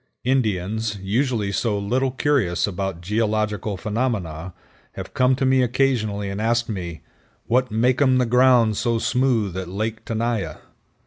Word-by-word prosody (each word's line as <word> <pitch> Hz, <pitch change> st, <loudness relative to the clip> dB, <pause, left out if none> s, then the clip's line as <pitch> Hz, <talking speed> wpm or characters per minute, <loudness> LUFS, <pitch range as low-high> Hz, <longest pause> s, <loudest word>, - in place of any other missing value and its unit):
Indians, 110 Hz, -4 st, 0 dB
usually 110 Hz, +1 st, 0 dB
so 105 Hz, +1 st, 0 dB
little 125 Hz, +7 st, 0 dB
curious 130 Hz, -, +1 dB
about 95 Hz, -3 st, -4 dB
geological 105 Hz, 0 st, -1 dB
phenomena, 100 Hz, -7 st, -2 dB, 0.4 s
have -, -, -8 dB
come 130 Hz, 0 st, +3 dB
to 130 Hz, -, -1 dB
me 130 Hz, 0 st, +4 dB
occasionally 120 Hz, -5 st, 0 dB
and 100 Hz, +2 st, -4 dB
asked 120 Hz, +1 st, +1 dB
me, 85 Hz, -6 st, -5 dB, 0.4 s
"What 125 Hz, +1 st, +1 dB
makeum 130 Hz, +4 st, +3 dB
the 125 Hz, -, +2 dB
ground 120 Hz, -3 st, +4 dB
so 120 Hz, -2 st, +1 dB
smooth 115 Hz, -4 st, +1 dB
at 95 Hz, -1 st, -4 dB
Lake 110 Hz, +4 st, -3 dB
Tenaya?" 110 Hz, -8 st, -2 dB
110 Hz, 135 wpm, -22 LUFS, 100-125 Hz, 0.4 s, me